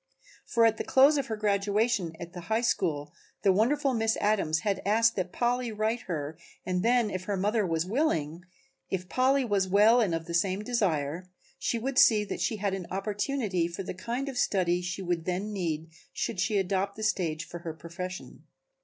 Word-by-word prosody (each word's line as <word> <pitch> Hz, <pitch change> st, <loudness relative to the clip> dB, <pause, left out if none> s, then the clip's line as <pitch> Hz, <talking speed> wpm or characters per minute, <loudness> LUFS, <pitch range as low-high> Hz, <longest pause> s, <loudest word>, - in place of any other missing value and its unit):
For 230 Hz, -1 st, +3 dB
at 225 Hz, -1 st, +3 dB
the -, -, -2 dB
close 275 Hz, +3 st, +5 dB
of 270 Hz, -, -3 dB
her 220 Hz, -, -2 dB
graduation 205 Hz, -2 st, 0 dB
at 170 Hz, 0 st, -8 dB
the 175 Hz, -, -7 dB
High 220 Hz, +1 st, +2 dB
School 155 Hz, -10 st, -1 dB, 0.3 s
the 195 Hz, -2 st, +5 dB
wonderful 270 Hz, +7 st, +2 dB
Miss 225 Hz, -1 st, +1 dB
Adams 195 Hz, -7 st, +1 dB
had 200 Hz, -3 st, -1 dB
asked 225 Hz, +3 st, +3 dB
that 185 Hz, -2 st, -2 dB
Polly 245 Hz, +1 st, 0 dB
write 215 Hz, +2 st, -1 dB
her 155 Hz, -1 st, -4 dB, 0.3 s
and 180 Hz, -1 st, 0 dB
then 235 Hz, -1 st, +2 dB
if 185 Hz, 0 st, -4 dB
her 200 Hz, 0 st, -1 dB
mother 210 Hz, +1 st, +1 dB
was 165 Hz, 0 st, 0 dB
willing, 180 Hz, -, 0 dB, 0.5 s
if 185 Hz, -1 st, -3 dB
Polly 260 Hz, +4 st, +2 dB
was 200 Hz, -4 st, +1 dB
well 210 Hz, +5 st, +5 dB
and 185 Hz, -7 st, +1 dB
of 165 Hz, 0 st, -4 dB
the 170 Hz, -, -6 dB
same 190 Hz, +4 st, +1 dB
desire, 180 Hz, -7 st, -1 dB, 0.3 s
she 235 Hz, -, 0 dB
would 255 Hz, +3 st, 0 dB
see 215 Hz, -2 st, +6 dB
that -, -, -5 dB
she 225 Hz, -, 0 dB
had 200 Hz, -2 st, -1 dB
an 190 Hz, -3 st, -4 dB
opportunity 205 Hz, -1 st, -1 dB
for 170 Hz, +3 st, -6 dB
the -, -, -5 dB
kind 235 Hz, +9 st, -4 dB
of 265 Hz, -3 st, -3 dB
study 180 Hz, -3 st, +1 dB
she 185 Hz, +2 st, -4 dB
would 175 Hz, -2 st, -2 dB
then 190 Hz, +4 st, -2 dB
need 165 Hz, -4 st, -3 dB, 0.2 s
should 215 Hz, -, -3 dB
she 205 Hz, +2 st, +1 dB
adopt 195 Hz, +1 st, 0 dB
the 220 Hz, -, -6 dB
stage 165 Hz, -7 st, 0 dB
for 175 Hz, -, -8 dB
her 165 Hz, -2 st, -6 dB
profession. 180 Hz, +3 st, -8 dB
200 Hz, 200 wpm, -28 LUFS, 175-225 Hz, 0.5 s, see